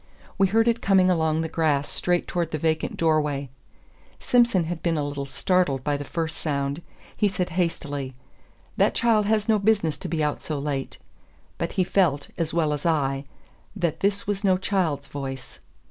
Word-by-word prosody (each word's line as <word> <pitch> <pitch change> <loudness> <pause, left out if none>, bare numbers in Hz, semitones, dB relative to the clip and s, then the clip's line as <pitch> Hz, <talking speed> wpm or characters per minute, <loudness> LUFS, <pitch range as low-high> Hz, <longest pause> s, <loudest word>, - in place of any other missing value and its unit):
We 195 - +5
heard 225 +4 +3
it 235 0 +2
coming 190 -2 +4
along 160 -2 +1
the 165 - -1
grass 150 -3 +1
straight 175 -1 0
towards 170 -3 -1
the 155 - -1
vacant 160 +1 -1
door 160 -2 +3
way. 140 -3 -3 0.7
Simson 235 -7 +3
had 165 0 -4
been 165 -2 0
a 145 -1 -1
little 140 -1 -4
startled 140 -1 +1
by 145 +1 0
the 145 - -4
first 160 +2 -3
sound. 140 0 -2 0.3
He 210 - +2
said 180 -2 -2
hastily, 145 -6 -2 0.6
"That - - +3
child 220 -4 +3
has 215 -1 +1
no 220 -2 +3
business 200 -7 +1
to - - -5
be 160 -1 0
out 150 -1 -1
so 155 - -3
late." 140 -1 -3 0.6
But 170 - -2
he 185 - +2
felt, 165 -7 +1
as 165 -2 -2
well 155 -2 +1
as 145 - -4
I, 140 -4 0 0.5
that 170 -5 -1
this 200 0 0
was 205 0 -2
no 190 -2 +4
child's 175 -7 0
voice. 135 -2 -7
160 Hz, 185 wpm, -25 LUFS, 145-185 Hz, 0.7 s, We